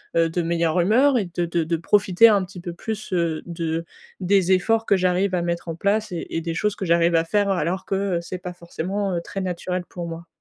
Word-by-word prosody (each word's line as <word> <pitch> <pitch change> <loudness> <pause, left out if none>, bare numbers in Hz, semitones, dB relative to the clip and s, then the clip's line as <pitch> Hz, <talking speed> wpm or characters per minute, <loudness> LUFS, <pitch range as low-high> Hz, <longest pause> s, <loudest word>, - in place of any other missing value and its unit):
heu, 165 0 +3
de 175 +2 -1
meilleure 170 0 +1
humeur 250 +9 +4
et 210 - 0
de 175 - 0
de 170 0 0
de 165 +1 -1
profiter 195 +4 +4
un 200 -4 +3
petit 180 0 -11
peu 175 - -5
plus, 215 +4 -6
heu, 170 -3 0
de 165 -1 -3 0.4
des 190 0 +2
efforts 225 +5 +2
que 200 - +4
j'arrive 185 +1 +1
à 180 - +1
mettre 170 0 -3
en 165 - -3
place 205 +4 0
et 170 -2 -4
et 165 - -2
des 165 0 -3
choses 210 +5 0
que 195 - -4
j'arrive 170 0 +3
à 165 - +4
faire 205 +3 +1
alors 185 0 -1
que, 195 - -1 0.2
heu, - - -1
c'est 180 +2 -6
pas 180 0 -7
forcément, 180 +3 -3
heu, 170 - -1
très 195 +3 -6
naturel 180 0 -3
pour 175 -2 -6
moi. 165 +1 -8
180 Hz, 240 wpm, -23 LUFS, 170-195 Hz, 0.4 s, humeur